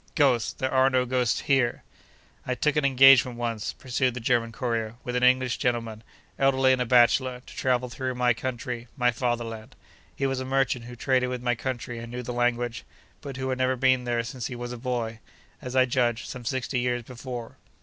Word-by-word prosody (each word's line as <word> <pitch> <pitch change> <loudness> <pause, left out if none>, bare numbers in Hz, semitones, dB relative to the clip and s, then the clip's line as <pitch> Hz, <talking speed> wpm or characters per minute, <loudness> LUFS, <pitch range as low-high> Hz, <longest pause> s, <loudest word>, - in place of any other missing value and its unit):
Ghosts! 130 -6 +2
There 130 0 -3
are 130 0 +5
no 130 -1 +2
ghosts 125 -1 0
here!' 135 -4 +1 0.6
I 125 - -2
took 150 +5 +1
an 150 - +2
engagement 135 -2 +6
once 115 -3 -3
(pursued 130 -1 -1
the - - -4
German 115 -1 +1
courier) 115 -2 -2
with 125 - -4
an 125 - +1
English 125 0 +3
gentleman, 115 -3 -1 0.4
elderly 135 -1 +4
and 130 - 0
a 125 - -1
bachelor, 125 +1 +3
to - - -13
travel 125 -1 0
through 130 +1 -4
my 125 0 +3
country, 120 0 -5
my 125 -1 +3
Fatherland. 115 -2 -3 0.4
He 135 - -1
was 135 -1 -1
a - - -3
merchant 130 -2 0
who 120 0 -9
traded 125 0 +1
with 125 -1 -4
my 120 0 +2
country 120 -1 -4
and 115 0 -8
knew 125 0 -5
the 125 - -5
language, 120 -1 -1 0.4
but 140 -3 -7
who 130 0 -3
had 130 0 -2
never 130 0 +2
been 130 -1 +2
there 120 -1 0
since 120 0 -5
he 125 - -6
was 120 0 -6
a - - -6
boy—as 120 +1 -6
I 130 -1 +5
judge, 120 -2 0
some 125 -2 -8
sixty 130 +1 -1
years 120 -1 -1
before. 120 -1 -8
125 Hz, 200 wpm, -26 LUFS, 120-130 Hz, 0.6 s, engagement